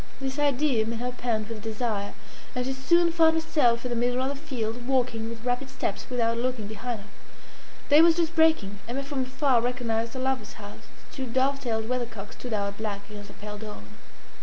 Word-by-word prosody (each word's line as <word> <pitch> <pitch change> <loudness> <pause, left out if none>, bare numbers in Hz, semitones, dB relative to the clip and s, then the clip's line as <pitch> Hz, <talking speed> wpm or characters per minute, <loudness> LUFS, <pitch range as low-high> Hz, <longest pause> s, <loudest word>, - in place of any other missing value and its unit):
This 270 +1 -3
idea 285 -4 +3
made 230 0 -2
her 245 +2 -2
pant 230 -4 -1
with 225 -2 -6
desire, 215 -2 -2 0.4
and 250 0 0
she 265 - -1
soon 335 +6 +4
found 325 -1 +5
herself 255 -7 +2
in 250 - -2
the - - 0
middle 245 +1 +1
of 265 - 0
the 285 - -3
field, 245 -5 -4
walking 245 -4 +1
with 230 0 -8
rapid 250 +2 0
steps, 260 -6 -3
without 230 -2 +1
looking 250 -3 -1
behind 220 +2 -4
her. 200 - -14 0.8
Day 295 +2 +8
was 335 0 +7
just 335 -1 +1
breaking. 315 -12 +3
Emma 260 +4 -2
from 275 -1 -2
afar 260 -1 +2
recognised 230 -2 -1
her - - -3
lover's 260 -4 -1
house. 205 -1 -11 0.2
Its - - -16
two 265 -2 -3
dove 265 +3 +2
tailed 220 -4 -1
weathercocks 230 -4 -3
stood 250 - -7
out 200 -1 -1
black 205 -2 -4
against 205 -1 -8
the 200 - -13
pale 210 0 -7
dawn. 210 - -8
245 Hz, 205 wpm, -27 LUFS, 220-265 Hz, 0.8 s, Day